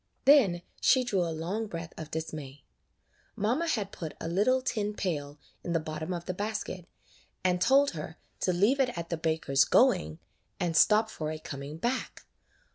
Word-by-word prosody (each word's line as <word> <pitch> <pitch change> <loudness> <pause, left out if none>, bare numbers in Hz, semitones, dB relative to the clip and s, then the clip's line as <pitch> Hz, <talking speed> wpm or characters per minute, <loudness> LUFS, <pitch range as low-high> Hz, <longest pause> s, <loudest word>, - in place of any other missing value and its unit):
Then 210 -12 +5 0.2
she 260 -1 +5
drew 205 -7 0
a 170 - 0
long 175 +8 -3
breath 165 -3 -7
of 160 -1 -8
dismay. 150 -4 -6 0.7
Mamma 245 +11 0
had 210 -10 -1
put 160 -3 -7
a - - -4
little 215 +10 +2
tin 210 -5 -1
pail 145 -7 -3 0.3
in 175 - -2
the 165 - +2
bottom 155 +2 -5
of 175 -1 -4
the 185 - -2
basket, 205 -3 -4 0.6
and 180 -1 +1
told 280 +4 +5
her 160 0 -7 0.2
to 185 - +1
leave 205 +10 +3
it 250 -7 +1
at 170 0 -5
the - - +1
baker's 160 -4 +2
going, 80 -9 +3 0.4
and 170 -2 -1
stop 220 +4 +5
for 155 -6 -4
it 155 0 -7
coming 140 +2 -6
back. 240 +8 -3
175 Hz, 175 wpm, -29 LUFS, 160-215 Hz, 0.7 s, Then